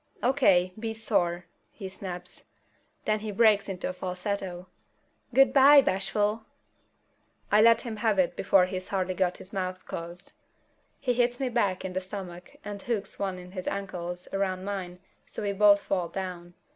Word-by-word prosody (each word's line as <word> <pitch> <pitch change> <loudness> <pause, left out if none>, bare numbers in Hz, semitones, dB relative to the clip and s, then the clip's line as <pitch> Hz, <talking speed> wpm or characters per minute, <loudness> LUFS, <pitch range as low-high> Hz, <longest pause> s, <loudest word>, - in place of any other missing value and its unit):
"O.K., 195 -9 +3
be 225 0 -3
sore!" 175 -6 0 0.2
he 195 - -8
snaps. 185 -2 -8 0.6
Then 215 0 +1
he 215 0 -5
breaks 210 -1 +4
into 185 -2 -3
a 185 - -3
falsetto: 185 0 -4 0.7
"Goo'bye, 270 +2 +7
Bashful!" 210 0 0 1.1
I 210 - +6
let 230 0 +6
him 225 -3 -6
have 215 -2 +1
it 185 -2 +2
before 190 -1 +4
he's 185 0 -5
hardly 185 -1 -1
got 180 -1 0
his 190 - -13
mouth 185 -1 -3
closed. 170 +1 -7 0.7
He 250 -2 0
hits 245 0 +1
me 265 -2 0
back 205 -7 0
in 185 - -4
the 185 - -1
stomach 185 -2 -8
and 205 -1 -6
hooks 225 -3 -3
one 195 -2 -2
of 180 0 -11
his 185 -2 -6
ankles 180 -3 -4
around 190 -1 -1
mine 190 -3 -4 0.3
so - - -6
we 200 - 0
both 200 0 +6
fall 180 -3 -1
down. 175 -1 -6
195 Hz, 160 wpm, -28 LUFS, 180-215 Hz, 1.1 s, Goo'bye